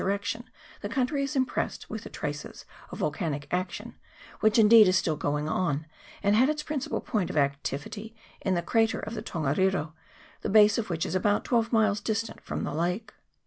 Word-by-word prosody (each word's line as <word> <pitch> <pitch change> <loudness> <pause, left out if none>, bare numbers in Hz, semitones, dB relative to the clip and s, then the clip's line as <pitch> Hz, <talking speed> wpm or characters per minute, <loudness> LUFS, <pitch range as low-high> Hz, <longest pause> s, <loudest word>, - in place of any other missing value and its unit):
direction 205 +5 -2 0.3
the 205 - -4
country 265 +4 0
is 280 +2 -3
impressed 260 -1 -1
with - - -5
the - - -8
traces - - -6 0.2
of - - -8
volcanic 145 -6 -2
action, 180 0 -3 0.5
which 215 +2 +3
indeed 220 -1 +8
is 185 - +4
still 160 - 0
going 150 0 -1
on, 155 -2 0 0.4
and 205 +1 +4
had 255 +6 +5
its 300 0 -1
principal 300 -3 -2
point 205 -6 -1
of - - -4
activity 145 +10 -2 0.3
in 190 -2 +1
the 175 - -1
crater 225 +4 +2
of 215 - -6
the 230 - -4
Ton 165 -3 -4
gariro, 155 +2 +1 0.5
the - - -2
base 210 +1 +6
of 215 - -3
which 165 -2 -1
is - - -3
about 205 +2 +1
twelve 235 -2 +1
miles 215 -3 +3
distant 220 +1 -2
from - - -4
the - - -3
lake. 180 +7 -2
205 Hz, 190 wpm, -28 LUFS, 170-225 Hz, 0.5 s, indeed